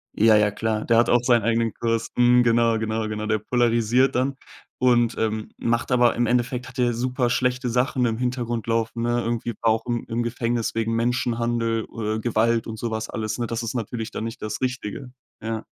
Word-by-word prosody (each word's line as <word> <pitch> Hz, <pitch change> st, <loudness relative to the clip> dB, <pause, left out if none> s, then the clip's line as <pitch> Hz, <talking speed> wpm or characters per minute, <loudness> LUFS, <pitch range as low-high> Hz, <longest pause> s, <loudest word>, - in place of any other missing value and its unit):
Ja, 110 Hz, 0 st, +5 dB
ja, 105 Hz, -1 st, +3 dB
klar. 110 Hz, +1 st, -2 dB
Der 115 Hz, -1 st, +3 dB
hat 120 Hz, -, +4 dB
auch 120 Hz, -, +5 dB
seinen 120 Hz, -4 st, +3 dB
eigenen 115 Hz, 0 st, +1 dB
Kurs. 115 Hz, -1 st, -2 dB
Mhm, 125 Hz, 0 st, +5 dB
genau, 115 Hz, -1 st, +3 dB
genau, 110 Hz, 0 st, -2 dB
genau. 110 Hz, 0 st, -4 dB
Der 110 Hz, -1 st, +2 dB
polarisiert 120 Hz, +2 st, +2 dB
dann 130 Hz, +2 st, 0 dB, 0.4 s
und, 120 Hz, -2 st, +3 dB
ähm, 110 Hz, -1 st, -2 dB
macht 115 Hz, +2 st, -1 dB
aber 120 Hz, -1 st, +4 dB
Im 120 Hz, -, +1 dB
Endeffekt 125 Hz, +1 st, 0 dB
hat 130 Hz, +1 st, -13 dB
der 120 Hz, -1 st, +2 dB
super 125 Hz, +1 st, -1 dB
schlechte 125 Hz, 0 st, 0 dB
Sachen 125 Hz, +1 st, +1 dB
im 115 Hz, -1 st, 0 dB
Hintergrund 120 Hz, -2 st, -2 dB
laufen, 115 Hz, +1 st, -1 dB
ne? 120 Hz, 0 st, +1 dB
Irgendwie 115 Hz, 0 st, -2 dB
war 115 Hz, -, +3 dB
auch 110 Hz, -, -1 dB
im 120 Hz, -1 st, -2 dB
im 120 Hz, +1 st, -1 dB
Gefängnis 120 Hz, 0 st, -1 dB
wegen 115 Hz, 0 st, 0 dB
Menschenhandel 115 Hz, -1 st, 0 dB
oder 110 Hz, -1 st, -3 dB
Gewalt 115 Hz, 0 st, +1 dB
und 110 Hz, 0 st, -6 dB
so 120 Hz, -, -2 dB
was 110 Hz, 0 st, -3 dB
alles, 110 Hz, +1 st, -3 dB
ne? 120 Hz, -1 st, -2 dB
Das 115 Hz, +1 st, -3 dB
ist 115 Hz, -, -3 dB
natürlich 115 Hz, 0 st, -4 dB
dann -, -, -5 dB
nicht 115 Hz, +1 st, -6 dB
das 110 Hz, +2 st, -4 dB
Richtige. 125 Hz, 0 st, -4 dB, 0.3 s
Ja. 110 Hz, 0 st, -4 dB
115 Hz, 205 wpm, -23 LUFS, 110-120 Hz, 0.4 s, Ja